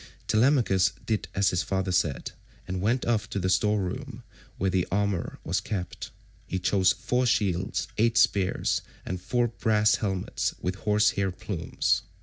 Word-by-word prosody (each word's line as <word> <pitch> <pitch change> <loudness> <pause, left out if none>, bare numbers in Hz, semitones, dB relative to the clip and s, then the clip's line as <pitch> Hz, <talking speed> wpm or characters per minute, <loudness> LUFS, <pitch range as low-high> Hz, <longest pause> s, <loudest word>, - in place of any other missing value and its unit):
Telemachus 110 -5 +3
did 110 -2 -1
as 100 0 +3
his 90 - +1
father 95 -1 -1
said, 85 -6 0 0.4
and 95 -1 -3
went 115 +6 +1
off 115 -3 0
to - - -4
the 95 -1 0
store 105 +2 +2
room 90 -2 -5 0.3
where 95 +1 0
the 90 -1 +1
armour 100 -3 -1
was - - 0
kept. 95 -5 -5 0.4
He 95 - -2
chose 95 0 +3
four 125 0 0
shields, 100 -6 0
eight 115 +1 +3
spears, 100 -5 +2 0.2
and 90 0 -4
four 120 +4 +1
brass 110 -1 +2
helmets 95 -4 -2
with 90 - -2
horse 105 +1 +3
hair 100 -1 0
plumes. 90 -2 -1
100 Hz, 155 wpm, -27 LUFS, 90-110 Hz, 0.4 s, Telemachus